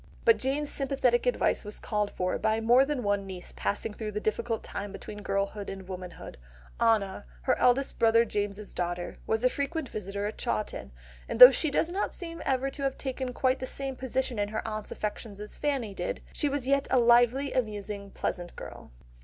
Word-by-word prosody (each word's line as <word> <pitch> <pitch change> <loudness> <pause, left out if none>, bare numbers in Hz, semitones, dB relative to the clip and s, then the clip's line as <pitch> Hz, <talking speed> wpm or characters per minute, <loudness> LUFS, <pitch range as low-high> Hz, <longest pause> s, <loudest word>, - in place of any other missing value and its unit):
But 455 -2 +6
Jane's 285 +3 -1
sympathetic 260 -3 +1
advice 245 - +2
was 210 0 -1
called 210 -1 -1
for 185 -2 -2
by 220 0 +1
more 240 +4 +5
than 285 -3 -2
one 205 -1 0
niece 185 -2 -7
passing 100 - -2
through 215 -1 -5
the 210 - -1
difficult 220 +2 -1
time 200 0 -5
between 210 +1 -8
girlhood 200 +1 -2
and 190 -1 -7
womanhood; 180 - -8 0.4
Anna, 220 -4 +2 0.2
her - - +3
eldest 260 +2 +2
brother 230 0 +5
James's 205 -1 -3
daughter, 175 0 -3
was 220 +1 0
a - - +6
frequent 285 +2 -2
visitor 200 0 -4
at 210 - -4
Chawton, 210 - -3 0.4
and - - -3
though 250 +1 +14
she 310 +3 0
does 320 +4 +1
not 390 +3 -2
seem 335 -3 -7
ever 270 0 +1
to 280 - -9
have 275 -1 -1
taken 260 -1 -3
quite 260 +1 +1
the 260 - -4
same 270 0 -2
position 260 -2 -2
in 205 - +1
her 220 +1 -3
aunt's 215 -1 -4
affections 210 -1 -5
as 210 0 -6
Fanny 270 -8 -1
did, - - -4
she 295 - +1
was 275 -2 -2
yet 275 0 +2
a 260 - +3
lively, 245 +3 +4
amusing, 210 -4 -3
pleasant 175 -2 -4
girl. - - -9
225 Hz, 195 wpm, -29 LUFS, 205-265 Hz, 0.4 s, though